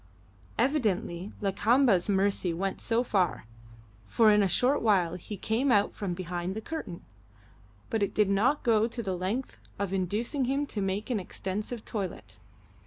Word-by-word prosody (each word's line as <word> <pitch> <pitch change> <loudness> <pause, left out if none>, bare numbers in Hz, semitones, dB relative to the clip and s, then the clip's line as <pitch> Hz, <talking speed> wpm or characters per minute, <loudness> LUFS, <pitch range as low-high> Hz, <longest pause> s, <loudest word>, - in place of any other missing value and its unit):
Evidently 210 - 0
Lakamba's 210 0 +3
mercy 195 -3 +1
went 195 +2 -2
so 235 +1 +1
far 190 - 0 0.6
for 220 - +5
in 210 0 +5
a 195 - +3
short 255 +9 +2
while 190 -7 +3
he 185 +3 -7
came 235 +8 0
out 205 -3 +3
from 190 -4 -3
behind 180 +1 -4
the - - -2
curtain 220 - -6 0.9
but 225 - 0
it 200 - -1
did 210 -2 +4
not 215 +9 +2
go 225 -2 +3
to 235 0 -5
the 190 -3 -2
length 195 +9 -3 0.2
of 200 -1 -2
inducing 215 - -1
him 275 +3 0
to 220 -7 -4
make 195 +5 -2
an 225 - +1
extensive 210 +5 -5
toilet. 140 - -5
205 Hz, 160 wpm, -29 LUFS, 185-235 Hz, 0.9 s, for